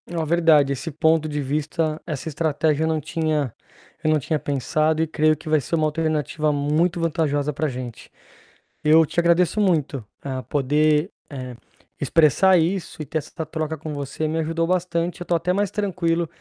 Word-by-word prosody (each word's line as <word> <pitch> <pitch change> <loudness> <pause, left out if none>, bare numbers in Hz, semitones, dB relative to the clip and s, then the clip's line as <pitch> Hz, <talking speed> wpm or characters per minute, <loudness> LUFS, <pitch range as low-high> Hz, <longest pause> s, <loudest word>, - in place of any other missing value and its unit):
É 175 - -7
uma 165 -1 -1
verdade, 155 -4 +4
esse 140 +5 -5
ponto 160 +1 +2
de 150 0 -2
vista, 155 +3 -2
essa 155 -2 -4
estratégia 155 0 0
eu - - +1
não 160 -1 0
tinha 155 -4 -1 0.5
eu 155 - +2
não 155 -1 +3
tinha 150 +2 -1
pensado 155 +3 0
e 160 - +1
creio 155 0 +2
que 160 - -14
vai 155 -1 +3
ser 150 - -2
uma 155 -1 +1
alternativa 155 -1 0
muito 150 +5 +1
vantajosa 150 -3 0
pra 155 +3 -1
gente. 125 -3 -7 0.7
Eu 160 +2 +6
te 165 - -2
agradeço 170 +3 +3
muito 155 - +1 0.2
a 130 -2 -3
poder, 150 +5 +1 0.2
eh, 130 -3 -7 0.5
expressar 170 +4 +4
isso 175 +2 -1
e - - -4
ter 155 +3 -2
essa 160 +2 -7
troca 155 0 -3
com 155 +1 -6
você 145 +2 -3
me 160 +1 -1
ajudou 165 +1 0
bastante, 175 0 -1
eu - - -4
tô 175 - +1
até 175 +2 0
mais 200 +1 0
tranquilo 175 -5 0
155 Hz, 185 wpm, -23 LUFS, 150-165 Hz, 0.7 s, Eu